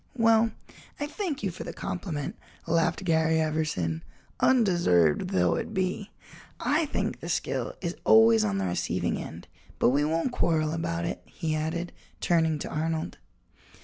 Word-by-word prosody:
"Well, 230 -1 +4 0.5
I 290 - -1
thank 315 - -4
you 195 - 0
for 170 - -7
the - - -6
compliment," 175 -6 -4 0.3
laughed 165 +3 +1
Garry 160 -1 +3
Everson, 155 - -1 0.4
"undeserved 175 - +3
though 90 -2 +2
it - - -3
be. 190 +2 -1 0.5
I 305 +2 +1
think - - -2
the - - -7
skill - - -2
is 170 -1 -3
always 110 0 +6
on 100 -2 0
the 95 - 0
receiving 90 -1 -1
end - - -8 0.3
but - - +4
we 140 +3 +2
won't 165 - 0
quarrel 160 -8 +1
about 165 +1 -2
it," 170 - -4
he 160 -3 -3
added, 160 +3 -2 0.3
turning 160 -2 +2
to - - -5
Arnold. 160 - -2
165 Hz, 150 wpm, -27 LUFS, 150-185 Hz, 0.5 s, always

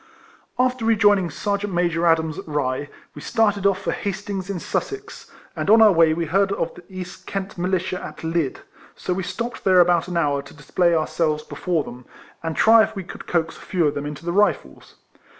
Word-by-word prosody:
After 255 -1 +1
rejoining 205 -5 +4
Sergeant 200 +3 -2
Major 170 -1 +1
Adams 160 -1 +2
at - - -9
Rye, 145 -1 -2 0.2
we 145 - -10
started 205 -1 +1
off 195 -1 +1
for - - 0
Hastings 200 -1 -4
in 195 -3 -3
Sussex, 410 - -5 0.3
and - - -2
on 220 +2 +7
our 220 -2 +8
way 165 -3 +5
we 165 +1 -1
heard 195 +5 +2
of 170 - -2
the - - -13
East 185 -1 -9
Kent 195 -1 -4
Militia 185 0 -1
at - - -9
Lydd; 165 -4 -1 0.3
so 180 - -2
we 190 - -2
stopped 235 +6 -5
there 185 -2 +5
about 175 -1 +4
an 175 -1 -3
hour 145 -4 +1
to 140 +1 -15
display 170 +4 +1
ourselves 155 -1 0
before 170 -5 -2
them, 125 -1 -10 0.4
and 165 -1 -3
try 225 0 +6
if 220 +1 0
we 195 - -4
could 180 - -10
coax 165 -2 0
a - - -14
few 180 -4 0
of 145 - +2
them 145 +1 -4
into 150 +2 -8
the 170 - -1
Rifles. 205 +2 0
180 Hz, 205 wpm, -22 LUFS, 160-200 Hz, 0.4 s, our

